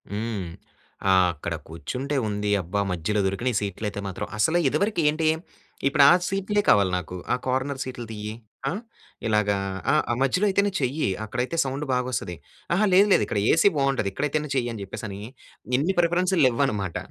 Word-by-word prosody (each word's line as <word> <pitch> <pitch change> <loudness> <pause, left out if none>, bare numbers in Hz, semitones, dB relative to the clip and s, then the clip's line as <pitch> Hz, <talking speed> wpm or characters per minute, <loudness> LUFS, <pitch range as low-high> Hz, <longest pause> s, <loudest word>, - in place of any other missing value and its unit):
హ్మ్. 105 -2 -3 0.6
ఆ - - +6 0.2
ఆక్కడ 85 +1 -5
కూర్చుంటే 130 - -4
ఉంది, 105 0 -2
అబ్బా! 90 +4 -3
మధ్యలో 90 +5 -1
దొరికినీయి 110 +4 -1
సీట్లయితే 100 +1 -4
మాత్రం. 95 - -5
అసల 160 +11 +3
ఇదివరకి 170 +7 +1
ఏంటి, 155 +1 0 0.6
ఇప్పు‌డా 140 0 +6 0.2
సీట్లే 195 +2 0
కావాలి 100 -2 +5
నాకు, 90 0 -6 0.2
ఆ - - +3
కార్నర్ 130 +2 -1
సీట్లు 125 -2 -6
తియ్యి. 105 0 -5 0.4
ఆ! - - -1 0.6
ఇలాగా 105 -2 +2 0.3
ఆ! - - +3 0.2
ఆ - - +2
మధ్యలో 180 +10 +2
అయితేనే 200 +1 +2
చెయ్యి, 135 +2 0 0.2
అక్కడైతే 125 +8 -3
సౌండు 135 +3 -3
బాగొస్తది. 125 -8 -2 0.4
అహా! 210 +4 +3
లేదు, 195 +3 +6
లేదు, - - +4
ఇక్కడ 105 - -1
ఏసీ 165 +5 +5
బావుంటది, 135 -7 +1
ఇక్కడైయితేనే 150 +5 -1
చెయ్యి 120 -2 0
అని 110 - -7
చెప్పేసని, 100 +1 -7 0.6
ఇన్ని 170 +8 0
ప్రిఫరెన్సులు 175 +1 +2
లెవ్వన్నమాట. 115 -8 0
125 Hz, 155 wpm, -25 LUFS, 105-150 Hz, 0.6 s, ఆ